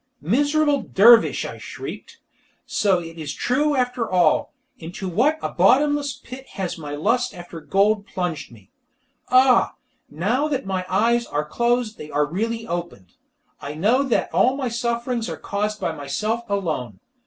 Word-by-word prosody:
"Miserable 290 - +2
dervish!" 230 +4 +5
I - - -7
shrieked, - - -8 0.5
"so 195 -3 +2
it 165 -1 -8
is 145 -2 -5
true 295 +4 +1
after 250 -2 -1
all! 175 -4 +2 0.3
Into 175 +4 -6
what 250 - +2
a - - -1
bottomless 285 +8 +3
pit 260 +2 -11
has 190 -3 -3
my 145 -2 -6
lust 230 +11 0
after 175 -2 -9
gold 200 +4 +1
plunged 175 -8 -4
me. 105 -4 -18 0.6
Ah, 255 -1 +4 0.3
now 215 - 0
that 275 -3 -2
my 185 -1 -3
eyes 235 +2 +2
are 150 +1 -2
closed 235 +5 0
they 150 - -8
are 150 0 +1
really 225 +8 -3
opened. 170 - -6 0.5
I 145 +1 -6
know 215 - +2
that 270 -4 0
all 260 +2 +3
my 260 -3 -2
sufferings 235 0 -2
are - - -5
caused 210 +1 -3
by - - -1
myself 215 +11 -3
alone! 155 - -2
215 Hz, 155 wpm, -22 LUFS, 170-250 Hz, 0.6 s, dervish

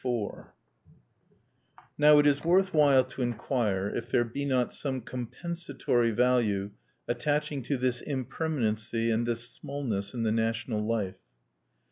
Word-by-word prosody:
_ 120 -5 -2
IV - - -18 1.5
Now 150 0 +6
it 145 - +5
is 145 0 +3
worth 185 +3 +3
while 140 -4 +5
to 130 +1 -8
inquire 115 -4 -1
if 115 +3 -4
there 120 - +3
be 130 +5 -4
not 130 -3 +1
some 130 -3 -3
compensatory 125 0 -2
value 110 -4 +1 0.4
attaching 145 +3 -1
to 140 +3 -2
this 125 -1 0
impermanency 115 -5 -1
and 115 +1 0
this 115 0 0
smallness 120 -8 -4
in 115 - -1
the 110 - +1
national 115 0 -1
life. 105 -4 -2
125 Hz, 135 wpm, -29 LUFS, 115-140 Hz, 1.5 s, Now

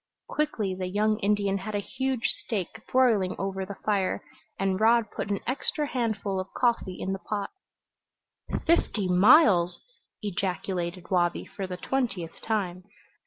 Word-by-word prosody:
Quickly 230 -11 -1
the 185 0 -3
young 210 +3 +1
Indian 200 -2 +1
had 210 +2 -5
a - - +1
huge 260 +3 -2 0.2
steak 215 -1 -3
broiling 225 -8 +3
over 195 -1 -3
the 200 - -6
fire, 200 -3 +1 0.4
and 190 -1 +1
Rod 230 0 +4
put - - -4
an 200 -1 -1
extra 280 +4 0
handful 220 -7 -1
of 185 +1 -5
coffee 235 -7 +1
in 190 - -2
the 195 - -4
pot. 205 0 -3 1.1
"Fifty 230 - +2
miles!" 180 - +6 0.4
ejaculated 180 -2 -3
Wabi 175 -2 +2
for 195 -2 -6
the 180 -1 -5
twentieth 200 -8 -2
time. 185 -5 -1
200 Hz, 140 wpm, -27 LUFS, 185-225 Hz, 1.1 s, miles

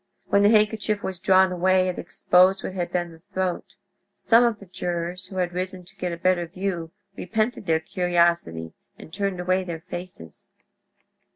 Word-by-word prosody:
When 200 - +4
the 205 - +6
handkerchief 215 -1 +2
was 185 -2 -4
drawn 190 0 +4
away 185 +1 +2
it 180 - -3
exposed 185 +2 +3
what - - -4
had 175 -2 -3
been 175 -1 -1
the 165 - -15
throat. 185 +1 -4 0.4
Some 230 +1 +4
of 235 -3 +1
the 200 - -13
jurors 180 0 -4
who 190 - -11
had 180 -1 -1
risen 185 0 -4
to - - -19
get 180 -1 -3
a 170 - -4
better 175 0 +1
view 180 -2 -4 0.3
repented 220 +2 -2
their 160 -1 +3
curiosity, 170 - 0 0.2
and 160 - -13
turned 195 -2 -2
away 185 +1 +1
their 170 -3 -6
faces. 175 - -9
185 Hz, 175 wpm, -24 LUFS, 175-195 Hz, 0.4 s, the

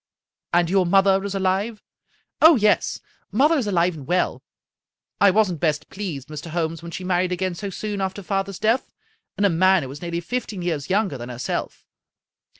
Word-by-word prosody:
" - - -54
And 175 -1 +4
your 185 0 +2
mother 195 +1 +4
is 200 0 -4
alive? 195 +3 -1 0.2
" - - -40
" - - -53
Oh, 320 +1 +9
yes; 210 -4 +2 0.3
mother 285 - +4
is 235 - -2
aHve 180 -2 +2
and 145 -5 -10
well. 180 +2 0 0.8
I 200 - +6
wasn't 190 -4 +2
best 150 -2 -1
pleased, 170 -10 -5
Mr. 155 +2 -7
Holmes, 165 -1 -2
when 170 - -8
she 170 +3 -6
married 180 0 +1
again 185 0 -1
so 200 +3 -5
soon 205 +1 -4
after 190 +1 -3
father's 195 0 -2
death, 225 +4 +1 0.5
and 205 - +2
a - - +5
man 185 +1 +4
who 130 - -6
was 140 +2 -9
nearly 170 -1 -3
fifteen 215 -2 -4
years 160 -5 -2
younger 190 - 0
than 120 +1 -7
herself. 125 0 -4
185 Hz, 195 wpm, -23 LUFS, 170-200 Hz, 0.8 s, Oh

